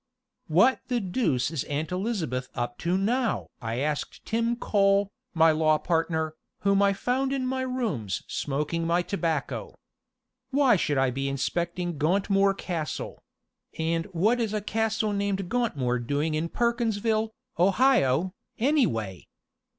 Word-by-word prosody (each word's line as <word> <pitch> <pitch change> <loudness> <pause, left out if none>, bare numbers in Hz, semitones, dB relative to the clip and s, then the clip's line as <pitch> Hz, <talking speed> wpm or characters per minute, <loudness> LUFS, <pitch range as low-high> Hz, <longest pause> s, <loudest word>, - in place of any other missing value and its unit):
"What 190 +11 +4
the 245 -1 0
deuce 175 - 0
is 160 -5 -2
Aunt 150 +3 -3
Elizabeth 180 - -2
up 120 0 -3
to 175 +2 +1
now?" 230 +4 0 0.2
I 115 0 -3
asked 150 0 -3
Tim 230 +1 0
Cole, 200 -3 +2 0.2
my 160 0 +6
law 155 0 +3
partner, 160 -1 0 0.3
whom 200 0 +3
I 200 0 +5
found 255 +7 0
in 270 -2 -1
my 260 +1 -1
rooms 225 - -2
smoking 150 +4 -2
my 175 +1 +2
tobacco. 165 -7 -2 0.7
"Why 270 -4 +4
should 150 -5 0
I 135 -1 +3
be 135 +2 -2
inspecting 170 +4 -2
Gauntmoor 195 +4 +2
Castle 165 -4 -4 0.6
and 165 +1 0
what 205 +7 +1
is 215 -2 -1
a 210 - -1
castle 220 0 0
named 200 -2 -1
Gauntmoor 140 - 0
doing 145 +6 -1
in 160 +2 -1
Perkinsville, 225 -1 0 0.3
Ohio, 185 - +3 0.2
anyway? 120 - 0
180 Hz, 135 wpm, -27 LUFS, 155-225 Hz, 0.7 s, my